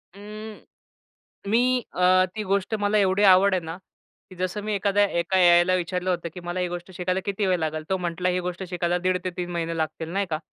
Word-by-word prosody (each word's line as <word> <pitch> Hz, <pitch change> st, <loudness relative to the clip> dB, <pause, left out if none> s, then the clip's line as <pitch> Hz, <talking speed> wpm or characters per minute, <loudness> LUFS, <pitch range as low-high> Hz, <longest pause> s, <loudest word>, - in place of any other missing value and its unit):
अं, 210 Hz, +1 st, -9 dB, 0.9 s
मी 230 Hz, +3 st, +4 dB, 0.4 s
अ, 185 Hz, +1 st, +4 dB
ती 215 Hz, -, -3 dB
गोष्ट 200 Hz, +2 st, 0 dB
मला 205 Hz, +1 st, +1 dB
एवढी 195 Hz, 0 st, +2 dB
आवड 190 Hz, +2 st, +5 dB
आहे 185 Hz, -, +1 dB
ना, 165 Hz, +1 st, -6 dB, 0.5 s
की 185 Hz, -, -12 dB
जसं 185 Hz, +3 st, -3 dB
मी 215 Hz, 0 st, -2 dB
एखाद्या 200 Hz, +1 st, +2 dB, 0.2 s
एका 190 Hz, +2 st, 0 dB
एआयला 175 Hz, +1 st, +5 dB
विचारलं 180 Hz, +1 st, -2 dB
होतं, 170 Hz, -2 st, -1 dB
की -, -, -8 dB
मला 175 Hz, +1 st, -4 dB
ही 180 Hz, -, 0 dB
गोष्ट 175 Hz, +1 st, -7 dB
शिकायला 185 Hz, +1 st, -1 dB
किती 200 Hz, 0 st, -1 dB
वेळ 185 Hz, -1 st, +2 dB
लागेल? 155 Hz, 0 st, -3 dB
तो 190 Hz, -, +1 dB
म्हटला 180 Hz, +1 st, -2 dB
ही 180 Hz, -, 0 dB
गोष्ट 180 Hz, +1 st, -4 dB
शिकायला 175 Hz, 0 st, 0 dB
1.5 185 Hz, 0 st, +2 dB
ते 185 Hz, -, -1 dB
3 175 Hz, 0 st, -4 dB
महिने 165 Hz, -1 st, -3 dB
लागतील, 160 Hz, +1 st, -3 dB
नाही 200 Hz, +1 st, 0 dB
का? 155 Hz, -, -2 dB
185 Hz, 215 wpm, -24 LUFS, 175-195 Hz, 0.9 s, आवड